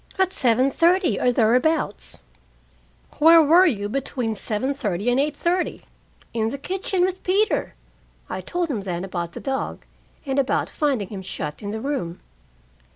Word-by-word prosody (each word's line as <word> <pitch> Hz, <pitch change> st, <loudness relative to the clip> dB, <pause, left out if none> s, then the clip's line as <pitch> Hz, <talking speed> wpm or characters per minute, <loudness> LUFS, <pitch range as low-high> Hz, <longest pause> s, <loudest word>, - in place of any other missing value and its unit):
"At 380 Hz, 0 st, +1 dB
seven 255 Hz, +2 st, +2 dB
thirty, 345 Hz, +4 st, +3 dB
or 250 Hz, -, +3 dB
thereabouts." 245 Hz, +1 st, +1 dB, 1.0 s
"Where 330 Hz, +2 st, +8 dB
were 335 Hz, +4 st, +6 dB
you 205 Hz, -, -1 dB
between 250 Hz, -1 st, -2 dB
seven 220 Hz, +6 st, -2 dB
thirty 210 Hz, -4 st, -1 dB
and 250 Hz, -, +2 dB
eight 295 Hz, +1 st, 0 dB
thirty?" 350 Hz, +4 st, -1 dB, 0.5 s
"In 225 Hz, -1 st, 0 dB
the 275 Hz, -, -5 dB
kitchen 375 Hz, +5 st, -2 dB
with 370 Hz, +1 st, 0 dB
Peter." 405 Hz, +4 st, +1 dB, 0.5 s
I -, -, -4 dB
told 350 Hz, -3 st, -2 dB
him 220 Hz, -6 st, -2 dB
then 180 Hz, -2 st, -4 dB
about 175 Hz, -3 st, -4 dB
the -, -, -6 dB
dog, 270 Hz, 0 st, -4 dB, 0.4 s
and 270 Hz, 0 st, 0 dB
about 265 Hz, -, 0 dB
finding 265 Hz, -, 0 dB
him 200 Hz, -3 st, -6 dB
shut 150 Hz, -5 st, -5 dB
in 205 Hz, -, -5 dB
the 220 Hz, +2 st, -4 dB
room. 225 Hz, -10 st, -3 dB
265 Hz, 155 wpm, -23 LUFS, 210-330 Hz, 1.0 s, Where